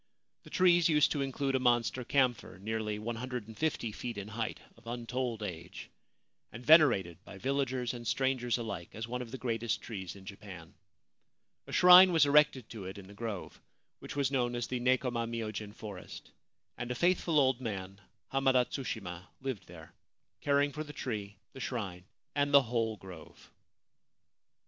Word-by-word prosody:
The - - -14
trees 175 -2 +4
used 150 -2 +4
to 145 - 0
include 135 0 -1
a 130 - +2
monster 120 0 +2
camphor 125 -7 +1
nearly 105 +1 -3
150 120 +3 -3
feet 120 +1 -6
in 100 +1 -6
height, 115 +1 -3 0.2
of 115 0 -19
untold 120 -1 -3
age, 90 -3 -7 0.6
and 120 +2 -10
venerated 100 - +5
by 100 - -11
villagers 130 0 -1
and 120 -2 -7
strangers 130 -3 +1
alike 105 -8 -5
as 110 +1 -4
one 125 +1 -3
of 120 - -7
the 130 - -6
greatest 115 -3 -1
trees 95 -6 -6
in 95 -1 -13
Japan. 95 -4 -10 0.9
A - - -9
shrine 180 +1 +9
was 165 -3 +5
erected 145 -4 +4
to 110 -4 -7
it 95 +2 -7
in 100 - -10
the 100 - -13
grove, 105 -3 -6 0.4
which - - -8
was 140 -2 +1
known 120 -3 0
as 120 -1 -1
the 125 0 -3
Nekoma 125 -2 +1
myojin 110 -3 -4
forest; 100 -5 -9 0.5
and 125 - -4
a 125 - -2
faithful 170 0 +2
old 130 -2 +2
man, 100 -4 -5 0.3
Hamada 135 -2 +4
Tsushima, 100 -10 -5
lived 130 -6 -5
there, 80 -2 -13 0.5
caring 145 0 +2
for 155 +2 -4
the 150 -1 -10
tree, 105 -7 -5 0.2
the - - -10
shrine, 100 -9 -4 0.3
and 145 0 +1
the 140 -1 +7
whole 115 -2 -1
grove. 90 -5 -13
120 Hz, 165 wpm, -32 LUFS, 105-135 Hz, 0.9 s, shrine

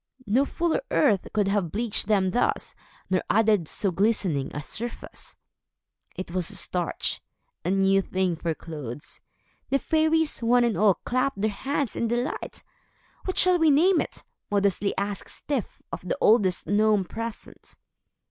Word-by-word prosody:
No 240 +7 +2
fuller's 340 - -1
earth 210 -10 +2
could 210 -2 +1
have 195 -5 0
bleached 220 -2 +1
them 195 -3 +2
thus, 245 - 0 0.4
nor 185 - +2
added 210 -6 +3
so 195 +4 -1
glistening 185 -7 0
a 150 - -5
surface. 235 +9 -6 0.8
It 185 -2 -6
was 180 -2 -1
starch, 175 -2 -2 0.4
a 175 - -1
new 195 0 +3
thing 185 -2 -1
for 165 0 -2
clothes. 145 -6 -7 0.5
The 275 - +3
fairies, 315 +1 +1
one 240 +1 +4
and 235 -3 +1
all, 205 -3 +4
clapped 255 -1 0
their 215 +1 +1
hands 270 +4 -2
in 235 - 0
delight. 240 +4 -3 0.6
"What 370 - -3
shall 365 -1 +5
we 320 -1 +5
name 330 +5 +4
it?" - - -7 0.3
modestly 200 -1 0
asked 200 0 -3
Styf 275 -8 -4
of - - -5
the 180 - -3
oldest 205 -5 +3
gnome 210 -1 +2
present. 230 +3 -8
210 Hz, 150 wpm, -26 LUFS, 185-245 Hz, 0.8 s, shall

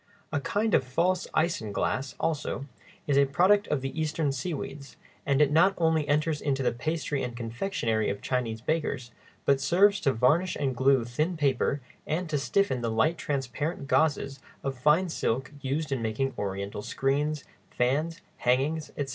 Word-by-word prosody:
A 145 - +2
kind 210 +9 0
of - - +5
false 175 +8 0
isinglass, 135 - 0
also, 150 -3 -2 0.4
is 140 -1 +3
a 140 - +6
product 190 +8 +4
of 145 -3 0
the 135 +4 -3
Eastern 155 -1 0
seaweeds, 140 -1 -5 0.3
and 140 +1 +4
it 145 - +1
not 185 +6 +5
only 160 -3 +2
enters 150 +1 +1
into 135 -2 0
the - - +2
pastry 150 +3 -2
and 120 -1 -4
confectionery 115 - -1
of 100 - -3
Chinese 115 -4 -2
bakers, 130 -4 -2 0.3
but 140 -1 +3
serves 195 +8 +4
to 140 - +2
varnish 145 +9 +2
and 135 -3 -1
glue 130 -1 +3
thin 155 +9 -1
paper 140 -1 +1 0.3
and 170 +3 -1
to 145 - +1
stiffen 145 -3 +1
the 115 - -1
light 135 +9 +1
transparent 140 +2 -3
gauzes 140 -3 +1 0.2
of 135 -1 -2
fine 150 +8 +3
silk 135 -5 -1
used 140 +3 -2
in 130 -3 0
making 115 +4 -1
Oriental 100 0 -4
screens, 145 +5 -1 0.3
fans, 150 +7 0 0.2
hangings, 140 +6 +1
etc. 140 -2 -2
140 Hz, 165 wpm, -28 LUFS, 130-160 Hz, 0.4 s, a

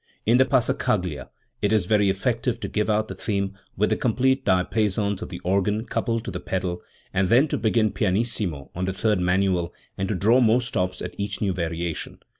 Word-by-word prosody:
In 115 +3 +5
the 130 - +5
passacaglia 95 - 0 0.3
it 105 - +1
is 110 -5 +3
very 105 0 +3
effective 115 +4 0
to - - -2
give 105 0 -1
out 110 0 +1
the - - -6
theme 100 -2 -2 0.2
with 105 +2 +2
the - - +4
complete 130 +2 +1
diapasons 100 +2 +1
of - - -5
tKe - - -7
organ 100 +4 +1
coupled 115 -1 -1
to - - -4
the - - -4
pedal, 90 -2 -3 0.3
and 95 -1 +1
then 130 +6 +5
to - - 0
begin 110 -1 +2
pianissimo 100 - -1
on 90 +2 -2
the 95 - -1
third 105 0 +1
manual 90 -1 +1 0.2
and 95 - -1
to 105 - 0
draw 110 +7 +4
more 120 -1 +4
stops 90 -6 -2
at - - -5
each 100 0 -3
new 100 -3 0
variation. 85 -1 -3
105 Hz, 200 wpm, -24 LUFS, 90-115 Hz, 0.3 s, In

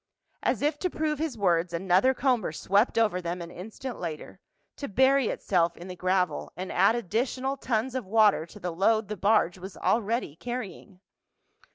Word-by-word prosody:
As - - 0
if 295 0 +1
to 365 - 0
prove 305 -3 -2
his 310 -6 -2
words 175 -3 +1
another 190 +9 +3
comber 250 - +1
swept 200 +9 +1
over 210 -5 +2
them 175 +1 -3
an 170 0 -7
instant 225 +8 -7
later, 160 -3 -6 0.4
to 280 - -5
bury 265 +3 +3
itself 170 -3 0
in 175 - -9
the 180 - -6
gravel 185 0 0
and 185 +1 -5
add 195 +5 +4
additional 250 +5 -1
tons 245 -2 -1
of 255 -6 -4
water 210 -5 +4
to - - -13
the 180 0 -3
load 210 +4 +2
the 210 - -3
barge 200 -3 +2
was 190 +1 -9
already 225 - 0
carrying. 200 -3 -7
210 Hz, 175 wpm, -27 LUFS, 180-250 Hz, 0.4 s, add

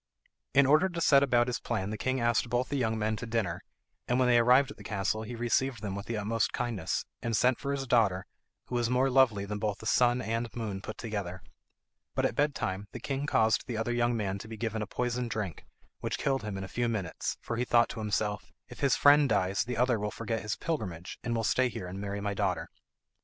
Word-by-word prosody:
In 140 0 +7
order 155 +7 +4
to 170 -2 -5
set 140 -4 +6
about 120 -3 +3
his 125 -1 -2
plan 95 +2 -2
the - - -2
king 130 +3 -1
asked 120 0 +1
both 120 +2 0
the 145 - -2
young 110 -4 0
men 110 0 0
to 115 - -6
dinner, 110 -7 -1 0.5
and 125 - +2
when 130 -1 +3
they 120 -1 +5
arrived 125 +4 +5
at - - -12
the - - -12
castle 105 +1 -1
he 115 +2 -6
received 120 0 0
them 100 -2 -3
with 100 0 -6
the 115 - -2
utmost 105 +1 0
kindness, 115 -8 -2 0.2
and 115 -2 0
sent 125 0 +3
for 140 - -3
his 140 -1 -2
daughter, 105 -7 +2 0.4
who - - -10
was 120 -1 +1
more 130 +2 +2
lovely 120 -7 +4
than 105 +1 -4
both 105 -1 -1
the - - -11
sun 120 +1 +3
and 115 0 -2
moon 105 -5 -4
put 110 - -7
together. 100 -6 -5 0.7
But - - +1
at - - +1
bed 145 -1 +1
time 95 +2 -3
the 125 - -5
king 135 +3 -3
caused 110 -3 +2
the 120 -3 -3
other 115 +2 -1
young 120 0 +1
man 100 -2 -2
to 110 - -9
be 110 0 -7
given 110 -1 -2
a 105 - -3
poisoned 125 +1 -2
drink, 105 -5 -4 0.3
which - - -2
killed 135 -2 0
him 105 -2 -5
in 95 - -4
a - - -5
few 120 +5 -1
minutes, 100 -7 -3
for 115 - -4
he 120 - +1
thought 120 -1 +4
to - - -6
himself, 105 -1 -2 0.2
"If - - -11
his 140 -2 +3
friend 145 -1 +6
dies 100 -2 +1
the 125 -1 -3
other 120 -2 +2
will 105 +1 -1
forget 115 +1 -3
his 105 - -2
pilgrimage, 95 - -4
and 120 - -1
will 115 - 0
stay 130 +3 +2
here 95 - -6
and 95 +2 -6
marry 100 0 -3
my 100 0 -1
daughter." - - -1
115 Hz, 245 wpm, -30 LUFS, 105-125 Hz, 0.7 s, In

